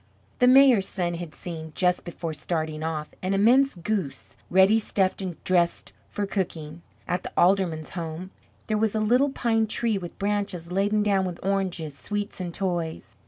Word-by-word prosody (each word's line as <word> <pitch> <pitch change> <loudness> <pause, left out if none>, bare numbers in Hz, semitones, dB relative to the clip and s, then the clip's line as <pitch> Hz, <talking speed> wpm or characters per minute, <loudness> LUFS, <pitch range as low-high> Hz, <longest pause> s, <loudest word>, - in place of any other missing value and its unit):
The 250 - +5
mayor's 255 -6 +6
son 175 -3 -2
had 170 -2 -7
seen, 160 -3 -7
just 180 -1 +1
before 170 -2 -5
starting 155 +2 -3
off, 155 -1 -3
an 185 +1 0
immense 250 +7 +4
goose 180 -4 -4
ready 190 +4 +5
stuffed 195 -3 0
and 185 -3 -4
dressed 175 -2 +1 0.2
for 205 - -2
cooking. 170 -5 -4 0.3
At 180 +1 -1
the - - -7
alderman's 175 -4 +2
home 170 +1 -6 0.3
there 215 -1 0
was 220 -1 +1
a - - +1
little 245 +6 +3
pine 225 -4 +1
tree 220 -1 0
with 175 -2 -9
branches 200 -4 -2
laden 205 +3 +1
down 200 -2 +2
with 180 -2 -5
oranges, 185 -6 -1
sweets, 205 +5 -4
and 175 -1 -4
toys. 170 -3 -3
185 Hz, 165 wpm, -25 LUFS, 170-210 Hz, 0.3 s, mayor's